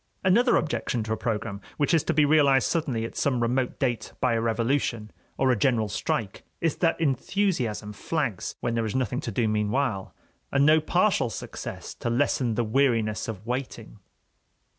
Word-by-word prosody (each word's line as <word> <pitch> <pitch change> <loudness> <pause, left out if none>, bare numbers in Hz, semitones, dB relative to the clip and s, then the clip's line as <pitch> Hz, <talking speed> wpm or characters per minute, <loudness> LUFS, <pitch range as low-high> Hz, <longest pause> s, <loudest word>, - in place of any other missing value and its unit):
Another 235 +7 +4
objection 125 -6 -1
to 110 +1 -2
a - - 0
program 105 -3 -3 0.2
which 145 +3 +1
is 165 - +4
to - - +1
be 150 -1 +5
realized 140 -3 +4
suddenly 135 -9 -1
at - - -8
some 130 -4 +1
remote 125 +2 0
date 120 -4 -2
by 125 -2 +2
a 115 - +1
revolution 115 -1 0 0.3
or 130 -1 +3
a - - +3
general 110 0 +2
strike 105 0 -2 0.2
is 165 -3 0
that 165 -2 +1
enthusiasm 135 - 0
flags 135 - -3
when 120 - -1
there 115 -1 0
is 105 - -4
nothing 125 -1 0
to - - -4
do 120 -3 +1
meanwhile, 105 0 -1 0.4
and 140 0 +3
no 155 +1 +5
partial 175 - +2
success - - -7
to - - -4
lessen 120 -1 +1
the 120 - +1
weariness 115 -2 +1
of 110 -2 -6
waiting. 120 -3 -5
125 Hz, 175 wpm, -26 LUFS, 110-145 Hz, 0.4 s, be